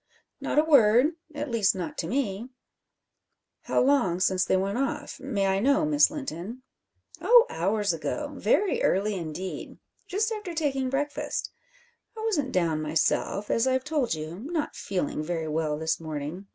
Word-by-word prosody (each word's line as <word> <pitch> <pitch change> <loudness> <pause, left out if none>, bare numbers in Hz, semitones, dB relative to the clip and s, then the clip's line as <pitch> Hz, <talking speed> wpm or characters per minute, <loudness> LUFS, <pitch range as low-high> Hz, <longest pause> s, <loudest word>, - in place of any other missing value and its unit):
"Not - - -3
a 300 - +6
word 265 -1 +5 0.2
at 290 -2 -4
least 215 -5 +2
not 290 +11 -4
to - - -2
me." 235 -3 -2 1.2
"How - - +1
long 250 -11 +2
since 185 0 +2
they 190 - +2
went 195 +5 -1
off 275 - -3
may 225 -8 -1
I 195 0 +2
know, 280 +7 +3
Miss 295 -1 +4
Linton?" 255 - -6 0.6
"Oh, 480 0 +7
hours 200 +2 0
ago! 280 - -4
Very 320 - +1
early, 205 +3 +2
indeed 180 +1 -5 0.3
just 430 +4 0
after 420 -6 -5
taking 270 -5 0
breakfast. 285 +2 -2 0.7
I - - -5
wasn't 295 -12 0
down 165 -4 +1
myself 160 +6 0
as 230 +3 +2
I've 260 0 +1
told 290 - 0
you, 155 +3 -6
not 310 +5 -3
feeling 180 -6 -2
very 165 0 -3
well 155 -1 -1
this 160 +1 -1
morning. 160 +4 -6
220 Hz, 155 wpm, -27 LUFS, 175-290 Hz, 1.2 s, Oh